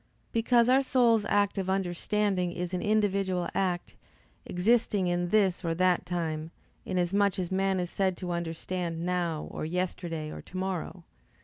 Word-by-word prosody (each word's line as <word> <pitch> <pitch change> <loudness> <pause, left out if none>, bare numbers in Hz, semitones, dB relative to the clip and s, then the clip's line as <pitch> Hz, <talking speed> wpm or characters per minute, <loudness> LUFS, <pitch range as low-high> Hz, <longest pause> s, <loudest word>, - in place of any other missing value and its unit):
Because 235 +1 +3
our 260 +2 +5
soul's 240 -5 +3
act 205 0 +2
of 190 -1 -2
understanding 190 0 0
is 180 +1 -4
an 180 - -1
individual 200 -4 +1
act, 180 -2 -1 0.5
existing 205 +1 +2
in 175 0 0
this 190 -3 +2
or 165 -1 0
that 180 0 +2
time, 160 -3 -2 0.4
inasmuch 190 +2 +1
as 180 -2 -3
a - - -1
man 190 0 +1
is 175 -1 -3
said 190 -2 0
to 180 -2 -4
understand 170 0 -3
now, 175 -3 -1
or - - -5
yesterday, 165 -2 -3
or - - -7
tomorrow. 185 -1 -4
185 Hz, 150 wpm, -29 LUFS, 175-200 Hz, 0.5 s, our